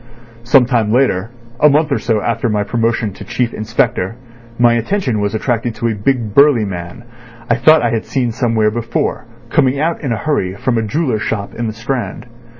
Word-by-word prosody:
"Some 125 +1 +5
time 115 -4 +1
later, 115 -5 +1 0.3
a 150 - +6
month 150 +1 +2
or 140 - +1
so 110 -3 0
after 115 +2 -1
my 105 -1 0
promotion 115 -1 -1
to - - -10
Chief 120 -2 -2
Inspector, 115 -2 -1 0.4
my 120 -1 +4
attention 120 - -1
was 100 +1 -1
attracted 115 0 -1
to 115 - -2
a - - 0
big 110 0 -1
burly 140 -4 +5
man, 90 +2 -7 0.4
I 120 - +3
thought 155 +3 +5
I 120 - +1
had 115 -1 -2
seen 125 -3 -1
somewhere 110 -2 +1
before, 115 +1 -2 0.3
coming 135 +1 +2
out 165 +2 -1
in 135 -6 -2
a 115 - 0
hurry 100 -12 -1
from 120 +3 0
a - - 0
jeweller's 110 0 -1
shop 100 -2 -3
in 120 0 -3
the 110 - -3
Strand. 120 +4 -4
115 Hz, 195 wpm, -16 LUFS, 110-130 Hz, 0.4 s, a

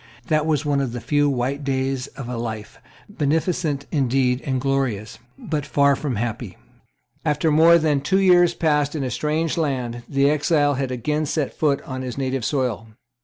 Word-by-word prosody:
That 155 0 +2
was 150 -1 0
one 145 -1 +1
of 130 -4 -3
the 120 - -4
few 145 +5 +1
white 135 +2 -2
days 135 -1 -1
of 135 -4 -6
a 125 - -4
life, 110 -2 -6 0.3
beneficent 160 -3 -1
indeed 130 -2 +1
and 130 -2 -1
glorious, 130 -6 -2 0.2
but 150 -2 -3
far 140 0 +3
from 135 -3 -3
happy. 115 -3 -4 0.7
After 155 +1 +1
more 165 +3 +6
than 155 -4 +1
two 190 +7 +1
years 175 -2 +5
passed 150 -2 +1
in 145 - -2
a 130 - -3
strange 155 +6 -1
land, 125 -6 -2
the 140 0 +2
exile 145 0 +2
had 135 -1 -2
again 150 +5 -1
set 145 -1 -2
foot 145 -3 0
on 130 -1 -6
his 125 -1 -5
native 135 -2 -2
soil. 125 -5 -1
140 Hz, 175 wpm, -22 LUFS, 125-150 Hz, 0.7 s, more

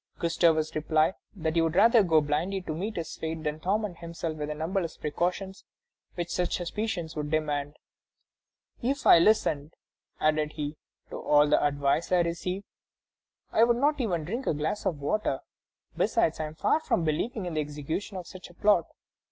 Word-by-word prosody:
Gustavus 165 -2 +2
replied 155 +2 +2 0.2
that 160 -3 -2
he 165 - +4
would 165 0 0
rather 225 +4 +6
go 165 -5 +4
blindly 155 +7 -1
to 160 - -4
meet 200 +7 -4
his 165 -2 -4
fate 160 0 -4
than 150 0 -2
torment 195 0 -1
himself 165 -1 -5
with 150 -1 -4
the 150 - -3
numberless 165 +2 -2
precautions 180 +5 -2 0.5
which 175 -1 -3
such 180 -1 0
suspicions 175 -2 -3
would 150 -1 -3
demand. 145 -2 -1 1.0
"If 270 +3 -1
I - - +9
listened," 165 -6 +2 0.4
added 155 0 +1
he, 150 0 -4 0.3
"to - - -5
all 150 0 +4
the - - +3
advice 145 +3 +1
I 180 -1 +5
receive, 180 +3 -2 0.9
I 225 - +4
could 235 0 +4
not 290 +2 +2
even 175 -9 -1
drink 235 - -4
a - - +2
glass 160 +8 -2
of 165 -6 -1
water; 145 -1 -1 0.5
besides, 160 - +1
I 155 - -1
am 155 - -10
far 305 - +2
from 175 - 0
believing 185 +7 -1
in 175 - -4
the 155 - 0
execution 150 +7 -4
of 180 - -6
such 185 +1 -11
a 175 - -17
plot. 205 -5 +3
165 Hz, 175 wpm, -28 LUFS, 155-190 Hz, 1.0 s, I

